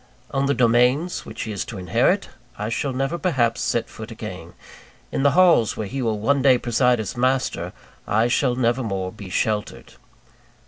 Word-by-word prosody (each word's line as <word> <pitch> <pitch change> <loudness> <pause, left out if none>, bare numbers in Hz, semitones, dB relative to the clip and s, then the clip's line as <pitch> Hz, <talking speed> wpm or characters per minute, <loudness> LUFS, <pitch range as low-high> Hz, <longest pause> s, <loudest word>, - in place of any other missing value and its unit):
On 135 0 0
the 140 - +1
domains 125 +8 +2
which 110 - -6
he 110 - -5
is 100 - -3
to 110 - -8
inherit, 90 -2 +1 0.3
I 105 +1 -3
shall 135 +4 -1
never 135 +6 -2
perhaps 125 -10 +1
set - - 0
foot - - -9
again: - - -8 0.6
in - - -1
the 140 0 +3
halls 170 - +5
where 110 - -3
he 135 +6 -4
will 110 -3 0
one 140 +6 +2
day 130 -2 +5
preside 120 0 +2
as 110 - -4
master, 130 +2 0 0.4
I 110 +2 +2
shall 125 0 +1
never 120 0 +1
more 95 -5 -3
be 100 -2 -10
sheltered. 105 +3 -2
120 Hz, 180 wpm, -22 LUFS, 110-135 Hz, 0.6 s, halls